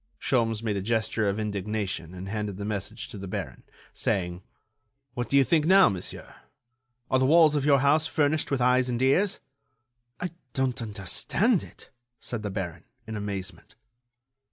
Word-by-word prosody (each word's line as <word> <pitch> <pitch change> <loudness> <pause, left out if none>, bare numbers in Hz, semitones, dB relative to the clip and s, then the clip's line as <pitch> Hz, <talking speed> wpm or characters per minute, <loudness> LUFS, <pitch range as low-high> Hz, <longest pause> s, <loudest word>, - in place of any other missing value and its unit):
Sholmes 115 -3 +1
made 105 -3 -1
a - - -2
gesture 110 0 0
of 100 - -2
indignation 100 -4 -3
and 90 +1 -7
handed 105 -1 -3
the 100 - -5
message 105 0 -4
to 105 - -8
the 100 - -6
baron, 90 - -5 0.3
saying: 90 -4 -1 0.7
"What 120 -2 -3
do 140 - +4
you 135 - +7
think 155 +2 +2
now, 190 +2 +7
monsieur? 95 -3 -6 0.7
Are 130 - +4
the 130 - +3
walls 160 0 +6
of 145 -2 0
your 140 -2 +5
house 150 +3 +3
furnished 155 -1 +1
with 135 -3 0
eyes 125 +1 +3
and 120 -1 -1
ears?" 175 +10 +2 0.8
"I 180 - -3 0.2
don't 130 -2 0
understand 115 - +1
it," - - -13 0.3
said 120 -3 -5
the 105 - -3
baron, 95 -4 -5 0.2
in 110 - -6
amazement. 100 -1 -6
110 Hz, 165 wpm, -27 LUFS, 100-140 Hz, 0.8 s, you